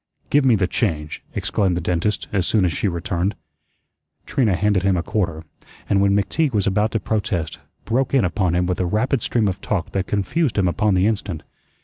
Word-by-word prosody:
"Give 145 -1 +4
me 125 -3 +5
the 95 -3 +1
change," 80 -7 -2
exclaimed 95 -4 0
the - - 0
dentist 90 +5 -1
as 95 -3 +1
soon 105 -4 +3
as 85 - 0
she 100 - -1
returned. 90 +2 -1 0.9
Trina 110 -8 +1
handed 105 0 +2
him 95 -1 +2
a 85 - -1
quarter; 85 -7 -2 0.4
and 100 -1 +2
when 100 0 +3
McTeague 135 - +1
was 105 -3 +1
about 105 +3 +2
to 110 - +1
protest, 100 -5 -2 0.3
broke 130 +4 0
in 135 -8 +3
upon 90 0 0
him 90 0 +2
with 90 0 -2
a 90 - +1
rapid 115 +6 0
stream 115 -3 +1
of 95 0 -3
talk 95 -4 -2
that 95 -1 -2
confused 110 - 0
him 95 -2 +3
upon 100 +3 +1
the 90 +1 +3
instant. 100 -6 -2
100 Hz, 205 wpm, -21 LUFS, 90-110 Hz, 0.9 s, me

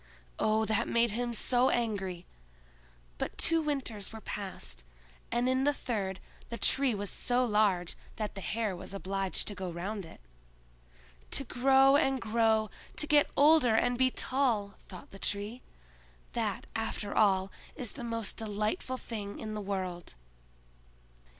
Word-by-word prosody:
Oh, 220 +1 +2
that 220 -1 +1
made 235 -1 +3
him 240 +2 -1
so 245 +2 +2
angry! 195 -7 -1 0.9
But - - -3
two 330 -1 +4
winters 265 -9 -3
were 220 - -8
past, 185 - -5 0.5
and 240 +1 +1
in 260 +1 +2
the 290 +1 +2
third 195 -8 -3 0.3
the 235 - -4
Tree 265 -2 +3
was 200 -1 -3
so 250 +1 +1
large 205 -6 +2 0.2
that 215 -1 -3
the 195 - -6
hare 215 -1 -1
was 185 +2 -7
obliged 195 0 -2
to 210 - -1
go 185 -2 -4
round 190 +2 -4
it. - - -13 1.1
"To 275 - 0
grow 270 +2 +5
and 270 -3 +2
grow, 220 -1 +2 0.2
to - - +1
get 295 -1 +4
older 290 -6 +6
and 245 +2 +3
be 260 +1 +3
tall," 245 -7 0 0.2
thought 185 - -11
the 195 - -11
Tree—"that, - - -5
after 205 - -2
all, 195 -2 +3 0.2
is 250 -7 -2
the 260 - -7
most 230 -2 -3
delightful 215 +4 -2
thing 210 -5 -6
in 215 -1 -5
the 210 - -3
world!" 185 - -4
215 Hz, 145 wpm, -31 LUFS, 195-245 Hz, 1.1 s, older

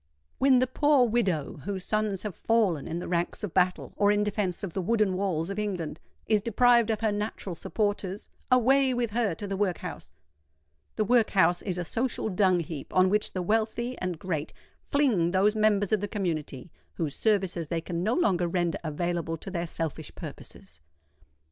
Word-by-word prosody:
When 265 -1 +5
the 255 - +4
poor 270 0 +3
widow, 195 -10 0
whose 195 -2 -4
sons 215 -3 -1
have 210 -3 -4
fallen 205 -10 +1
in 165 - -3
the 175 - -5
ranks 175 +4 -1
of 205 - -4
battle 180 -1 +1
or 205 0 +3
in 210 0 +2
defence 205 -3 -2
of 185 -4 -4
the 190 - -1
wooden 215 0 +2
walls 185 -2 -1
of 200 - -3
England, 180 -7 -3 0.3
is 215 -2 +2
deprived 235 +1 +4
of 220 -1 -1
her 220 -2 +2
natural 205 -2 -3
supporters, 205 +1 -2 0.2
away 260 +1 +4
with 240 -3 -1
her 220 -6 0
to 205 - -5
the 195 -1 -3
workhouse! 190 -3 -3 0.9
The 215 - +1
workhouse 200 -7 +3
is 185 -3 -3
a 175 - -3
social 230 +2 -1
dung 185 -2 +3
heap 155 -3 -7
on 185 0 +5
which 210 0 +1
the 185 - -2
wealthy 225 +5 0
and 180 -2 -3
great 155 -3 -3 0.3
fling 245 - +2
those 195 +4 +3
members 210 -2 +2
of 215 - +3
the 205 - -3
community 165 - -4 0.2
whose 155 -4 -2
services 190 -6 0
they 170 +1 -1
can 170 0 -4
no 215 +6 +1
longer 180 - +2
render 175 -1 -1
available 165 +1 -2
to 190 - -8
their 175 -2 -2
selfish 160 -2 -5
purposes. 75 - -10
195 Hz, 180 wpm, -28 LUFS, 175-220 Hz, 0.9 s, When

